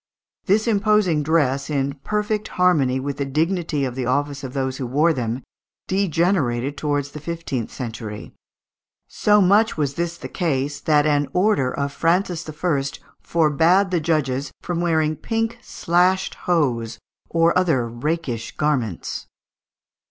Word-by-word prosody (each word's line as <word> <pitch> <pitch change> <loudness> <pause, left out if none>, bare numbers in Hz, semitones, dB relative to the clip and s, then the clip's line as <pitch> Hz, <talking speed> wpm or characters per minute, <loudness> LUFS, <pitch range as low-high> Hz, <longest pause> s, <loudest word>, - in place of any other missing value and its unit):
This 215 +4 +3
imposing 210 -7 +3
dress, 140 -3 +1
in 140 -1 0
perfect 210 0 -1
harmony 150 -8 +3
with 140 +1 -4
the 140 - -1
dignity 155 0 0
of 125 - -3
the 125 -1 -3
office 140 +2 -1
of 130 -1 -6
those 130 -1 -2
who 130 - -3
wore 150 +7 +3
them, 120 -1 -3 0.4
degenerated 160 -8 +1
towards 145 -1 -1
the 150 - -8
fifteenth 150 -7 -4
century. 110 -4 -7 0.7
So 210 0 +3
much 205 +3 +4
was 145 -3 0
this 170 +2 -3
the - - -7
case, 145 -4 -1
that 150 -1 +3
an 145 -1 +2
order 180 -9 +2
of 140 0 -3
Francis 170 +1 0
I. 150 -2 0 0.4
forbad 170 +4 +3
the 175 -3 +1
judges 145 -4 0
from 175 -1 -3
wearing 160 -2 +1
pink 225 +1 -2
"slashed 180 -1 +1
hose" 120 -10 0 0.3
or 165 0 +3
other 160 -10 +2
"rakish 120 0 -3
garments." 130 - -1
150 Hz, 135 wpm, -22 LUFS, 135-175 Hz, 0.7 s, much